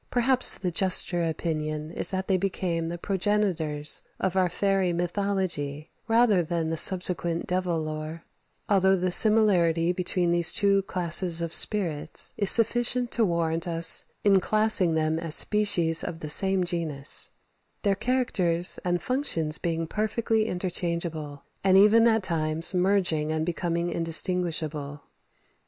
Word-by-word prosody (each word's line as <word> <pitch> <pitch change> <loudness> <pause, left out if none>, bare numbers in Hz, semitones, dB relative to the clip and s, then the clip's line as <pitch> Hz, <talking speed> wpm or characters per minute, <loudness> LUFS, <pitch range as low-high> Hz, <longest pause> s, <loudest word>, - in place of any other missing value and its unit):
Perhaps 255 +1 +1
the 185 -2 -4
juster 180 -1 +1
opinion 155 -1 -4
is - - +3
that 190 0 -3
they 190 - +1
became 175 -3 -3
the 175 - -5
progenitors 180 -6 -1 0.2
of 190 -1 -2
our 185 -1 +1
fairy 195 0 0
mythology 175 -5 -3 0.2
rather 225 -4 +3
than 165 -1 -3
the - - -2
subsequent 175 -1 0
devil 180 -2 -2
lore, 155 +1 -6 0.4
although 190 -1 +3
the 185 -1 -2
similarity 180 -6 +3
between 180 -1 -1
these 170 -1 +3
two 200 -2 +2
classes 175 -2 0
of 170 -1 -3
spirits 165 -7 0
is 200 -2 +1
sufficient 240 +1 +2
to 235 - +1
warrant 170 -3 -1
us 165 -1 +2 0.2
in 195 -2 +4
classing 215 -5 +3
them 160 0 -1
as 165 -2 -1
species 175 -7 +2
of 170 -2 -7
the 155 - -6
same 190 +4 +2
genus; 160 -5 0 0.5
their 200 -2 +2
characters 195 -7 +1
and 175 -1 -2
functions 165 - -1
being 165 -1 -3
perfectly 220 +3 -2
interchangeable, 170 -5 -4 0.2
and 190 -1 +4
even 220 +4 +5
at 220 -2 +1
times 160 -1 -1
merging 180 -5 0
and 155 0 -2
becoming 170 0 -3
indistinguishable. 165 -4 -1
175 Hz, 135 wpm, -25 LUFS, 165-195 Hz, 0.5 s, even